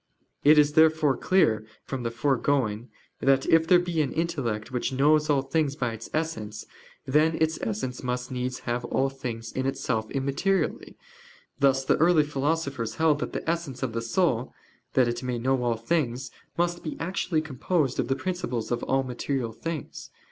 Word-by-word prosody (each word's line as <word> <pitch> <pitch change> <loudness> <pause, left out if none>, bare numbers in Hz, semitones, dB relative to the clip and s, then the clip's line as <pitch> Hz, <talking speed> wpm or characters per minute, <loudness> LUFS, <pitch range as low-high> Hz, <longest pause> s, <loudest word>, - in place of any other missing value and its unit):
It 150 +2 +7
is 150 0 +5
therefore 155 -3 +4
clear 115 - +2 0.2
from 135 -2 -4
the 120 - -1
foregoing, 120 -2 0 0.3
that 135 -1 +3
if 165 0 +4
there 180 - +7
be 175 -2 0
an 140 - -1
intellect 135 -9 -2
which 125 0 -1
knows 150 +3 +3
all 140 -2 +3
things 140 0 0
by 125 -5 -2
its 115 0 -8
essence, 155 -10 -3 0.4
then 155 +4 +3
its 160 0 +1
essence 125 +4 -3
must 125 0 -3
needs 125 0 -3
have 120 0 -2
all 135 +3 +1
things 120 -4 -6
in 130 0 -2
itself 110 -4 -2
immaterially; 140 +8 -1 0.6
thus 135 -1 +3
the - - +3
early 165 -1 +5
philosophers 140 -4 -2
held 160 -2 +3
that - - -4
the - - -4
essence 160 -6 -2
of 125 -4 -2
the 115 - -2
soul, 125 0 0 0.4
that 130 -2 +4
it 120 0 -2
may 125 -2 -2
know 130 +2 +1
all 120 -2 0
things, 125 0 -1 0.3
must 175 0 0
be 155 - -5
actually 170 -1 -1
composed 150 0 -1
of - - +1
the 135 - +1
principles 135 -10 -3
of 120 - 0
all 135 0 +1
material 125 -1 -3
things. 165 0 -6
135 Hz, 175 wpm, -26 LUFS, 125-160 Hz, 0.6 s, It